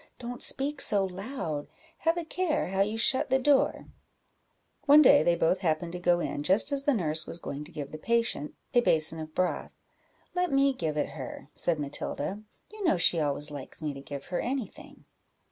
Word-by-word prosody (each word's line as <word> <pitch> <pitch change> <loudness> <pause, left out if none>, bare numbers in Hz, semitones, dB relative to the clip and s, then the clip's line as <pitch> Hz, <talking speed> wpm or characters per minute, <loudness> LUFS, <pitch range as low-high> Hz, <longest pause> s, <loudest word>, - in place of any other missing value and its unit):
don't 245 0 -7
speak 280 +1 -1
so 200 -2 +4
loud; 185 - -5 0.3
have 330 +1 +1
a 340 - -3
care 320 - -1
how 195 +1 0
you 210 +3 0
shut 260 +4 +2
the 265 - +4
door," 270 +1 +2
&c. - - -15 1.0
One 295 +2 +8
day 285 +2 +7
they 175 - +3
both 170 +2 +1
happened 170 -1 -1
to 180 - -6
go 175 0 +2
in 145 - -3
just 190 - +3
as 280 -1 +2
the 290 - +3
nurse 160 -5 0
was - - -1
going 145 -3 -6
to 165 - -14
give 145 -4 -6
the 155 - -7
patient 230 -7 -1 0.2
a 245 - +5
basin 160 -5 +2
of 155 0 -8
broth 185 0 -1 0.6
"Let 360 -2 0
me 275 0 +3
give 160 -10 -3
it 150 - 0
her," 140 0 -8
said 165 -3 -1
Matilda; 145 +6 -4 0.3
"you 430 -1 -8
know 335 - +3
she 170 0 +3
always 150 0 +1
likes 145 +2 -7
me 150 -2 -2
to 135 - -9
give 140 0 -8
her - - +1
any 255 -1 -1
thing." - - -16
185 Hz, 205 wpm, -28 LUFS, -, 1.0 s, One